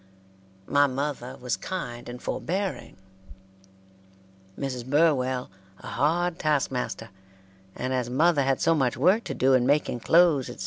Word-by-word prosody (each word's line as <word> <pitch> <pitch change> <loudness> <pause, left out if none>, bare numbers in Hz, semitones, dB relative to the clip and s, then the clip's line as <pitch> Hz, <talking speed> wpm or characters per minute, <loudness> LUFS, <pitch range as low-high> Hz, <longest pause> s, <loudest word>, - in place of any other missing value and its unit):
My 145 +4 +3
mother 135 -1 -4
was 125 -1 -2
kind 120 -11 -6
and 120 0 -7
forbearing; 190 +8 -4 1.6
Mrs. 130 -3 -4
Burwell 130 -3 +1 0.3
a - - -15
hard 175 +4 0
task 150 -4 +1
master; 120 -4 -4 0.6
and 130 +1 -3
as 125 -2 -1
mother 150 +4 +3
had 135 -1 +1
so 165 - +3
much 130 -7 0
work 185 - +3
to - - -4
do 135 +1 +3
in 125 -1 +3
making 140 -3 +1
clothes, 160 -2 +3
etc. 120 - -10
135 Hz, 140 wpm, -26 LUFS, 125-160 Hz, 1.6 s, My